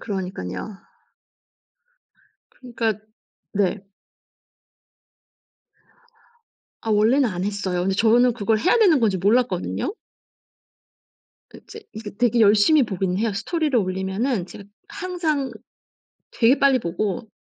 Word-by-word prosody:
그러니까요. 180 - -5 1.8
그니까 235 -3 -3 0.6
네. 200 0 -1 2.9
아 225 - -4
원래는 230 +6 +3
안 180 -2 -4
했어요. 200 -3 -2
근데 190 +2 0
저는 235 +4 +4
그걸 220 -1 0
해야 370 - +2
되는 360 - +4
건지 210 -4 +2
몰랐거든요. 205 - 0 1.6
그 - - -14
이제 445 - -11
이게 215 -1 -8
되게 235 +1 +2
열심히 215 +8 +5
보긴 190 -3 -2
해요. 225 0 0
스토리를 285 - -1
올리면은 190 +3 -2
제가 200 - -12 0.2
항상 345 -8 -2 0.8
되게 245 +4 +3
빨리 275 -2 +4
보고 200 +2 -3
220 Hz, 225 characters per minute, -22 LUFS, 195-255 Hz, 2.9 s, 열심히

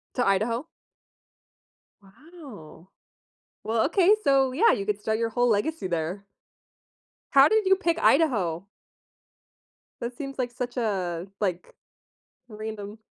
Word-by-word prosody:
To 245 - +1
Idaho? 225 +7 0 1.4
Wow. 210 - -14 0.8
Well, 225 0 +1
okay, 380 +4 +4
so, 270 -2 +3
yeah, 410 - +4
you 200 0 -2
could 210 -1 -2
start 220 +1 -1
your 230 0 0
whole 245 +2 +1
legacy 220 +2 0
there. 175 +3 -3 1.1
How 275 +1 +7
did 435 +1 +2
you 385 0 +5
pick 335 -3 0
Idaho? 200 - +2 1.4
That 240 +1 -5
seems 275 -2 -7
like 245 -1 -1
such 245 +1 -6
a, 185 -6 -2
like 180 -4 -3 0.8
random 215 -1 -7
230 Hz, 120 wpm, -26 LUFS, 200-275 Hz, 1.4 s, How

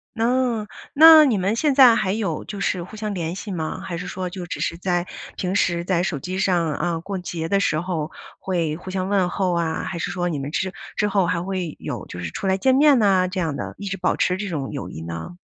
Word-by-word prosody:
哦， 235 -1 +1 0.3
那 315 +1 +9
你 235 -8 +2
们 195 +4 +1
现 290 +4 +2
在 260 -4 +8
还 195 -4 0
有 200 -7 -2
就 205 - -7
是 185 -2 0
互 185 +5 -11
相 210 -1 -4
联 165 -2 -3
系 200 +1 -6
吗？ 160 -4 -4
还 170 - -5
是 180 - -6
说 185 0 -4
就 180 0 -7
只 175 - -5
是 170 - -2
在 175 0 -1 0.3
平 185 +1 -2
时 170 -3 +1
在 175 -1 +1
手 165 -6 -2
机 185 +6 -5
上， 175 -5 +1
呃， 170 -2 -2
过 195 +2 -4
节 170 -2 -4
的 200 - +3
时 155 -6 +1
候 165 -3 -3 0.3
会 170 -5 -1
互 180 +3 -8
相 185 0 -2
问 195 -3 +2
候 185 0 0
啊， 170 -2 -1
还 175 - -4
是 170 - -3
说 175 -2 -1
你 155 - -2
们 140 +1 -5
之 190 +3 -1 0.2
之 210 - +1
后 195 -2 +2
还 170 0 0
会 180 -3 -3
有 - - -5
就 90 - -9
是 85 -1 -4
出 80 - -6
来 190 0 +3
见 260 +5 +3
面 285 -2 +6
呢， 190 -3 +3
这 185 +1 -4
样 160 -5 -1
的 - - -5
一 200 - -5
直 195 - -3
保 180 0 +1
持 180 0 +1
这 205 - -4
种 145 -7 -3
友 140 - -5
谊 80 - -8
呢？ 85 - -6
185 Hz, 270 characters per minute, -22 LUFS, 170-200 Hz, 0.3 s, 那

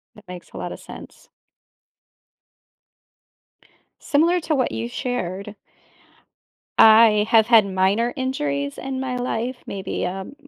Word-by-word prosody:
That 210 -3 -18
makes 180 -1 -10
a - - -9
lotta - - -6
sense. - - -13 2.7
Similar 335 +4 +2
to 310 - -2
what 255 - 0
you 110 +1 -4
shared 200 - -5 1.2
I 220 -1 +7
have 225 -1 +4
had 225 -4 +6
minor 195 +5 0
injuries 145 - -3
in 265 -1 -5
my 260 -1 -3
life, 245 0 -3
maybe 195 -1 -5
a 185 +2 -3
m 190 - -10
220 Hz, 120 wpm, -22 LUFS, 190-255 Hz, 2.7 s, I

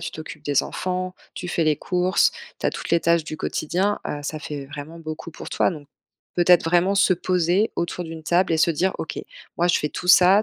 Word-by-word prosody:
tu - - -4
t'occupes 155 -1 -9
des 145 -2 +2
enfants, 185 0 -3 0.2
tu 180 - -6
fais 170 -1 0
les 155 -1 +3
courses, 180 +4 +2 0.3
tu - - -1
as - - +2
toutes - - -6
les 170 - +4
tâches 170 -1 +2
du 155 - -6
quotidien, 190 +9 -1
heu, 145 - -4
ça 155 +1 -4
fait 145 -2 -6
vraiment 150 +3 -8
beaucoup 155 0 -7
pour 165 - -9
toi - - +2
donc, 150 -5 -9 0.5
peut-être 175 0 +5
vraiment 175 +4 +3
se 195 -1 +4
poser 180 +3 +1
autour 175 +1 -2
d'une 160 -1 -8
table 175 +2 +2
et 160 - +3
se 165 - +4
dire: 180 +4 +1
«OK, 160 - -5 0.4
moi 175 +1 +3
je - - +4
fais 150 - -1
tout 180 - -6
ça, 185 +3 +7
170 Hz, 225 wpm, -23 LUFS, 155-180 Hz, 0.5 s, ça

